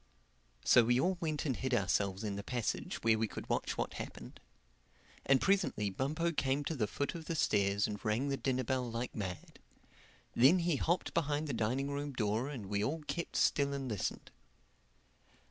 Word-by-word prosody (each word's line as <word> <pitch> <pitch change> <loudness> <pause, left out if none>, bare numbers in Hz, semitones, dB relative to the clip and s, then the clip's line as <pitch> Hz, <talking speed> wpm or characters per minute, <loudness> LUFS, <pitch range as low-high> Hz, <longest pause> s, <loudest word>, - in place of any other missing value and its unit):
So 120 - +7
we 120 +2 +3
all 180 +5 +1
went 155 -3 -1
and 135 -4 0
hid 130 +1 0
ourselves 100 -1 0
in 105 -2 -2
the 100 - -4
passage 120 +2 -2
where 110 -1 +4
we 110 - +1
could - - -8
watch - - -1
what - - -2
happened. - - -8 0.9
And 135 -1 +5
presently 185 - +1
Bumpo 155 - -1
came 140 -2 0
to 160 - -2
the 110 -6 0
foot 140 - -2
of 165 -2 -7
the 165 - -2
stairs 100 -7 +2
and 105 -1 -5
rang 120 +5 0
the 140 - +1
dinner 130 -1 0
bell 125 0 -1
like 115 +2 -3
mad. 95 -4 -6 0.7
Then 135 +9 +6
he 170 -4 +1
hopped 175 +5 0
behind 150 -2 0
the 140 - -2
dining 125 +5 0
room 145 0 -3
door 110 +2 0
and 125 -8 -6
we 100 +1 -1
all 155 +7 -2
kept 170 +3 -4
still 140 -1 +2
and 135 -1 -3
listened. 105 -6 -3
130 Hz, 185 wpm, -34 LUFS, 110-145 Hz, 0.9 s, So